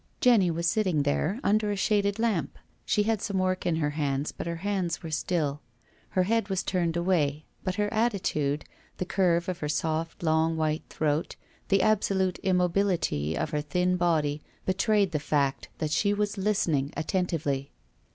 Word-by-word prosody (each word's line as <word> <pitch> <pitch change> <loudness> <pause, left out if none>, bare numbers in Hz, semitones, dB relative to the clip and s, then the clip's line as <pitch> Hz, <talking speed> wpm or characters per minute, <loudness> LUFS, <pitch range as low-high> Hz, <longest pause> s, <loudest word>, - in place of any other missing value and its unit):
Jenny 230 -8 +5
was 170 +1 -2
sitting 185 -7 +2
there, 155 - 0
under 210 0 +2
a - - 0
shaded 200 0 +1
lamp. 225 -7 -1 0.3
She 210 - +3
had 220 -1 0
some 200 -2 -2
work 185 -1 0
in 170 - +2
her 150 -2 0
hands 145 -1 -1
but - - -6
her 170 - -2
hands 185 -2 -2
were 165 - -6
still, 150 -2 -1 0.5
llcr 185 - +4
head 225 0 +1
was 190 -1 0
turned 170 -3 0
away, 155 -5 +1 0.2
but 185 -2 -2
her 210 0 +1
attitude, 185 -10 0 0.3
the 185 - -2
curve 175 -2 +1
of 180 -1 -3
her 150 - -3
soft, 160 +2 -2
long, 160 0 +2
white 155 0 -1
throat, 155 0 -1 0.3
the 195 -1 +3
absolute 195 -3 +1
immobility 180 - +1
of 150 - -2
her 150 -2 0
thin 180 +5 +1
body 155 -4 +1 0.2
betrayed 200 0 +2
the 155 - 0
fact 145 -2 0
that 155 -1 -2
she 205 +5 +2
was 205 0 -1
listening 175 -9 0
attentively. 155 -6 -1
175 Hz, 170 wpm, -28 LUFS, 155-195 Hz, 0.5 s, Jenny